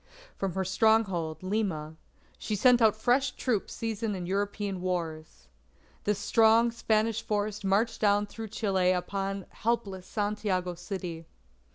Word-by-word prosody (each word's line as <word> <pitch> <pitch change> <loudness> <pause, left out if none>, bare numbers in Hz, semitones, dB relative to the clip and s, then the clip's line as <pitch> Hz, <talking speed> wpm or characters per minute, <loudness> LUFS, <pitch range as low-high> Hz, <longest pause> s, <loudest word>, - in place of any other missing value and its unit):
From 195 -3 -2
her 190 +1 -1
stronghold, 190 -6 +1
Lima, 185 -6 -2 0.4
she 215 - -2
sent 245 +3 +5
out 220 -2 +5
fresh 250 +5 +2
troops 230 -6 -2
seasoned 225 -2 -2
in 180 -2 -4
European 200 0 -2
wars. 160 - -4 0.6
This 210 -1 +1
strong 230 +1 +4
Spanish 220 -1 +1
force 210 0 -2
marched 210 +4 +1
down 205 -1 +3
through 220 +2 -7
Chile 195 -4 +1
upon 195 +1 -3
helpless 205 -5 -2
Santiago 205 -4 -1
City. 175 -2 -6
205 Hz, 130 wpm, -29 LUFS, 185-220 Hz, 0.6 s, sent